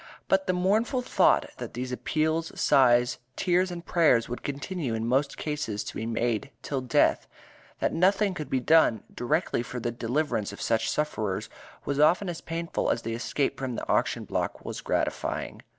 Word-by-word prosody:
But 190 0 +2
the 185 - +2
mournful 215 +8 +1
thought - - +3
that - - -7
these 125 +1 -4
appeals, 160 +5 -1
sighs, 125 -3 +4 0.2
tears 185 0 +2
and 175 -1 -7
prayers 150 -9 +3
would 120 - -5
continue 140 -2 -3
in 110 0 -2
most 135 +4 +1
cases 150 -9 -3
to - - -7
be 110 - -3
made 115 +1 -1
till 135 -2 -2
death, 125 -2 +2 0.5
that - - +1
nothing 195 +3 +3
could 150 -4 -6
be 130 - +1
done 125 -5 +4
directly 150 +2 0
for 125 +1 -6
the 120 0 -2
deliverance 120 -2 -1
of 100 - -10
such 115 -1 +1
sufferers 110 -9 -2 0.4
was 140 0 -1
often 175 +6 +4
as 170 - -5
painful 165 +1 -2
as 115 - 0
the 115 - -3
escape 130 +4 -1
from 130 -3 -3
the - - -5
auction - - +1
block - - -3
was - - -5
gratifying. - - -2
140 Hz, 175 wpm, -27 LUFS, 120-170 Hz, 0.5 s, sighs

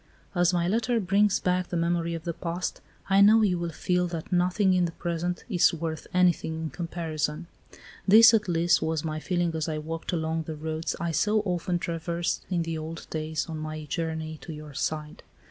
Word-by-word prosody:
"As 175 -1 +3
my 175 -1 +1
letter 230 +4 +1
brings 200 +1 +3
back 180 0 0
the 175 - -2
memory 170 0 0
of 165 - -6
the 170 - -3
past, 175 +2 -4 0.3
I 195 0 +5
know 215 +2 +7
you 180 -4 +2
will 170 0 -2
feel 180 +3 0
that 170 -2 -6
nothing 185 +2 +3
in 180 -1 +3
the 170 - -3
present 175 +1 -3
is 180 -6 +3
worth 160 -1 -4
anything 180 -3 +2
in 160 -1 -3
comparison. 165 -2 -3 0.6
This, 225 +3 +9
at 215 -2 +2
least, 170 -1 +3
was 160 -1 -1
my 155 -1 -2
feeling 175 0 -1
as 160 0 -2
I 155 - -2
walked 160 +2 -4
along 160 -1 -1
the 160 - -4
roads 160 +1 -3
I 170 -1 -1
so 210 +6 +2
often 180 -2 -1
traversed 170 0 -2
in 175 -3 0
the 165 -1 -3
old 160 +1 -7
days 155 0 -2
on 160 -2 -5
my 155 0 -5
journey 160 0 -3
to 170 - -8
your 150 -1 -9
side. 150 +1 -3
170 Hz, 195 wpm, -27 LUFS, 160-180 Hz, 0.6 s, This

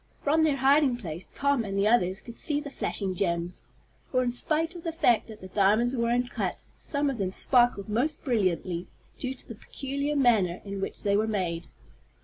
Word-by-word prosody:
From 310 +2 +3
their 305 -3 +3
hiding 275 -1 +4
place 175 -6 -7
Tom 280 -3 +1
and 195 -2 -4
the 200 +1 +3
others 190 -4 +2
could 235 -1 -10
see 295 -2 0
the 290 -1 -7
flashing 195 -7 -1
gems, 175 -1 -2 0.5
for, 255 -1 +2
in 245 - +1
spite 315 +7 0
of 345 - -8
the 330 - -3
fact 245 -8 +2
that 220 -2 -11
the 185 - -8
diamonds 215 +6 +2
were 235 -1 0
uncut, 245 +1 -1
some 285 0 -2
of 270 -5 -2
them 190 -2 0
sparkled 240 0 +2
most 245 +9 -1
brilliantly, 185 - 0 0.3
due 260 0 -3
to - - -15
the - - -7
peculiar 280 +6 -4
manner 220 -10 +3
in 200 -1 -5
which - - -5
they 200 -1 +2
were 215 +2 +2
made. 175 -6 -2
235 Hz, 195 wpm, -28 LUFS, 195-275 Hz, 0.5 s, hiding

